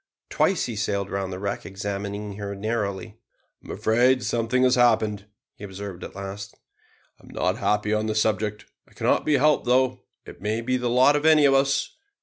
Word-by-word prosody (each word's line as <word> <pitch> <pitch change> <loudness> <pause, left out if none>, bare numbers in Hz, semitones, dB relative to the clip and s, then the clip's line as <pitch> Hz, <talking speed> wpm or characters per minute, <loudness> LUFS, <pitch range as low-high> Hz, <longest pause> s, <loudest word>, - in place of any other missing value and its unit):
Twice 190 - +1
he 120 - -5
sailed 100 -1 -2
round 95 -1 -3
the 90 - -5
wreck, 100 +1 -4
examining 100 +1 -5
her 100 -1 -5
narrowly. 105 0 -3 0.4
"I - - -15
am - - -7
afraid 125 +3 +2
something 120 +2 0
has 125 -1 +4
happened," 110 -5 +2 0.3
he - - -14
observed 95 -2 -7
at - - -9
last; 100 +1 -7 0.7
"I - - -18
am - - -16
not - - -1
happy 105 0 0
on 110 0 0
the 110 - -2
subject. 105 -1 -1 0.2
It - - -24
cannot - - +1
be 150 - +3
helped 150 0 +2
though. 130 0 +2 0.3
It - - -12
may 110 +3 -1
be 130 +2 -1
the 125 -1 -2
lot 130 +4 +4
of 145 - 0
any 155 -2 +6
of 135 - +5
us. 135 0 +1
110 Hz, 195 wpm, -24 LUFS, 100-125 Hz, 0.7 s, any